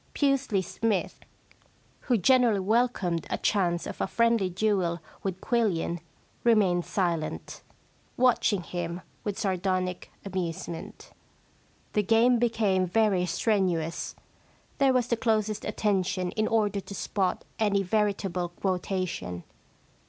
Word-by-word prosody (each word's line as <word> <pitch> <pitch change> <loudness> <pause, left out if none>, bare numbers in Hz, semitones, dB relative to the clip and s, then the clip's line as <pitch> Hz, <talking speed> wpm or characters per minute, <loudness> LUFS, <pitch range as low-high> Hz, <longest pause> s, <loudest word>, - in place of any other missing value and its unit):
Pusely 275 -8 +1
Smythe, 210 +1 -1 0.9
who 245 -3 +1
generally 235 +1 +4
welcomed 195 -5 +1
a - - -1
chance 175 -4 +1
of - - -6
a - - +1
friendly 230 -3 +2
duel 185 -3 0 0.2
with 190 -2 -3
Quillian 195 -8 0 0.4
remained 195 -7 +3
silent, 170 -6 -2 0.6
watching 235 -6 +3
him 175 +1 -4 0.2
with 205 -2 -3
sardonic 185 -1 -1
amusement. 170 -3 -5 0.8
The 210 - +3
game 230 +4 +4
became 210 -6 +2
very 190 -2 +2
strenuous. 175 -3 0 0.6
There 275 -1 +5
was 250 -2 +2
the 235 -1 0
closest 215 -2 0
attention 190 -3 0
in 215 0 0
order 210 -3 +1
to 200 +1 -8
spot 190 -1 -1
any 200 -2 +2
veritable 195 -3 0
quotation. 180 - -3
195 Hz, 110 wpm, -28 LUFS, 180-220 Hz, 0.9 s, There